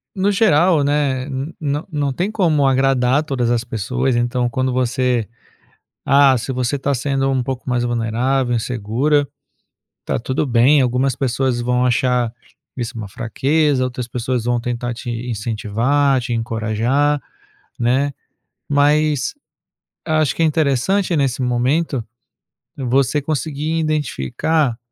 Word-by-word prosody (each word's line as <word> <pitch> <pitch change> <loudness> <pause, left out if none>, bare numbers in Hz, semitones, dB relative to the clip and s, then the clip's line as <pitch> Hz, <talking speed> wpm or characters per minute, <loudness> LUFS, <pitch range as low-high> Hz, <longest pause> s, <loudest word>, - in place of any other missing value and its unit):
no 195 +1 +1
geral, 175 -6 +4
né, 140 -2 0
n 135 +3 -5
não 145 0 -2
não 145 -3 -1
tem 180 +10 -2
como 165 -9 +2
agradar 135 0 +2
todas 130 -6 -1
as 120 -1 +1
pessoas, 125 +3 -1
então 120 +1 0
quando 130 +1 -1
você, 125 -2 0 0.8
ah, 140 -1 +5
se 120 +3 -4
você 125 +2 -1
tá 140 +1 0
sendo 135 0 0
pouco 130 0 -5
mais 120 -1 +1
vulnerável, 120 +2 0
insegura, 125 +6 0 0.8
tá - - -1
tudo 130 +6 -1
bem. 130 +3 +4
Algumas 130 +1 +1
pessoas 130 -1 0
vão 125 +1 +1
achar 125 -1 +1 0.5
isso 120 -2 -4
uma 110 -2 -5
fraqueza, 135 +7 0
outras 125 -1 -4
pessoas 125 0 -2
vão 120 0 +1
tentar 120 0 -3
te 120 +1 -7 0.2
incentivar, 120 +5 0
te 120 0 -3
encorajar, 115 +6 0 0.6
né. 130 +4 +1 0.6
Mas, 145 - +2 0.7
acho 155 -3 +1
que - - -2
é - - +5
interessante 160 +5 +1
nesse 135 -3 0
momento 130 +3 0 0.7
você 135 +2 +1
conseguir 155 +2 -2
identificar, 150 - 0
130 Hz, 130 wpm, -19 LUFS, 120-145 Hz, 0.8 s, ah